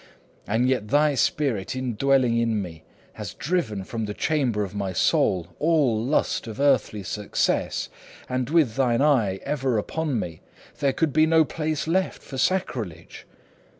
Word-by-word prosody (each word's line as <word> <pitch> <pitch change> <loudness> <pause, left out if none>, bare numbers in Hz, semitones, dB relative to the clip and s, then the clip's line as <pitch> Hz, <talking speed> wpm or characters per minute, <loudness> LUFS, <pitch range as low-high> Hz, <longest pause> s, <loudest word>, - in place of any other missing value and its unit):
And 115 +5 +1
yet 125 -5 0
thy 145 +4 +3
spirit, 135 - 0
indwelling 130 0 +2
in 115 -2 +1
me, 85 -5 -7 0.3
had - - -7
driven 140 - -1
from 115 +3 -4
the 105 0 -5
chamber 130 -9 0
of 100 - -6
my 100 -2 -3
soul 85 0 +2
all 145 -9 +2
lust 135 -2 0
of 110 +1 -7
earthly 135 -7 +2
success, 100 +3 -1 0.4
and 130 0 -2
with 150 -8 +2
thine 125 -1 +2
eye 120 -11 +3
ever 135 -5 0
upon 145 +3 -1
me, 80 -5 -6 0.4
there 140 -1 +2
could 155 0 0
be 155 0 +4
no 160 0 +5
place 155 0 -3
left 185 +3 0
for 135 - -7
sacrilege. 130 - -2
130 Hz, 150 wpm, -24 LUFS, 105-150 Hz, 0.4 s, no